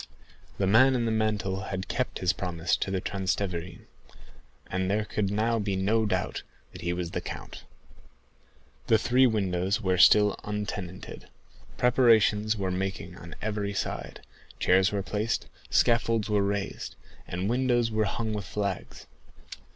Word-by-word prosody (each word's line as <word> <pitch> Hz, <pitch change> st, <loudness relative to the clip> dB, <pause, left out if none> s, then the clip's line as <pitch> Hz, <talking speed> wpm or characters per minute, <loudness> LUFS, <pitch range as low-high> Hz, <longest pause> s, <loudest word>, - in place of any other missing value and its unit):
The 100 Hz, -, +1 dB
man 130 Hz, +7 st, +5 dB
in 120 Hz, -2 st, 0 dB
the 115 Hz, -, 0 dB
mantle 105 Hz, -3 st, -1 dB
had 95 Hz, 0 st, -4 dB
kept 130 Hz, +1 st, -2 dB
his 90 Hz, 0 st, +1 dB
promise 90 Hz, -3 st, -1 dB
to -, -, -3 dB
the 95 Hz, -1 st, 0 dB
Transteverin, 90 Hz, -3 st, -3 dB, 0.8 s
and 95 Hz, 0 st, -2 dB
there 105 Hz, +2 st, +1 dB
could 105 Hz, -2 st, -1 dB
now 115 Hz, +2 st, +1 dB
be 100 Hz, -2 st, -1 dB
no 105 Hz, +4 st, +1 dB
doubt 95 Hz, -3 st, -1 dB, 0.3 s
that -, -, -10 dB
he 85 Hz, -, -1 dB
was 90 Hz, -1 st, -3 dB
the -, -, -3 dB
count. -, -, -8 dB, 1.2 s
The 110 Hz, -, +5 dB
three 125 Hz, +4 st, +4 dB
windows 95 Hz, -3 st, 0 dB
were 95 Hz, -4 st, 0 dB
still 105 Hz, +2 st, +6 dB
untenanted. 105 Hz, -3 st, -5 dB, 0.5 s
Preparations 110 Hz, -4 st, +4 dB
were 95 Hz, -2 st, -1 dB
making 90 Hz, -2 st, -3 dB
on 85 Hz, 0 st, -10 dB
every 105 Hz, -2 st, -2 dB
side; -, -, -4 dB, 0.3 s
chairs 95 Hz, +1 st, +4 dB
were 100 Hz, -2 st, -1 dB
placed, 105 Hz, +3 st, -2 dB, 0.2 s
scaffolds 115 Hz, -2 st, +2 dB
were 105 Hz, -1 st, +3 dB
raised, 100 Hz, 0 st, -3 dB, 0.3 s
and 90 Hz, +2 st, -3 dB
windows 120 Hz, -1 st, +1 dB
were 110 Hz, 0 st, +1 dB
hung 110 Hz, +2 st, -2 dB
with 105 Hz, -2 st, -4 dB
flags. 100 Hz, 0 st, -4 dB
100 Hz, 145 wpm, -28 LUFS, 95-110 Hz, 1.2 s, still